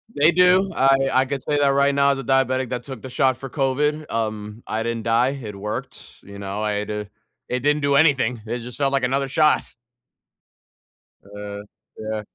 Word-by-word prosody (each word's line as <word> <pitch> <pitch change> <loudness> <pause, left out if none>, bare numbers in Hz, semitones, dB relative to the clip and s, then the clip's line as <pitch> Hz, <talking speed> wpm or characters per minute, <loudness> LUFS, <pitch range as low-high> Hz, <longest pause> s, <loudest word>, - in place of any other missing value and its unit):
They 155 +4 +5
do, 180 +2 +4
I 135 -1 +4 0.2
I 130 +1 +4
could 135 0 -4
say 145 -1 0
that 140 - +3
right 140 +1 +3
now 140 0 +3
as 135 - -2
a - - -5
diabetic 130 -1 +1
that 125 -1 -4
took 130 -5 -8
the 130 - -8
shot 130 0 +1
for 135 0 -8
COVID, 150 +3 -1
um, 110 -1 -4
I 110 +1 -2
didn't 115 -1 -3
die, 115 +3 +2
it 105 -3 -7
worked, 105 +2 -6 0.2
you 100 0 -11
know? 100 +1 -4
I 105 - 0
had 105 0 -3
to 105 -1 -4 0.4
it 125 - -1
didn't 145 +3 +1
do 140 -1 +2
anything, 135 -7 +3
it 120 +2 -3
just 120 +1 -9
felt 140 -1 0
like 135 -2 +1
another 135 +2 0
shot. 150 +3 +3 1.6
Uh, 100 0 -8 0.3
yeah. 110 0 -4
130 Hz, 200 wpm, -22 LUFS, 110-140 Hz, 1.6 s, They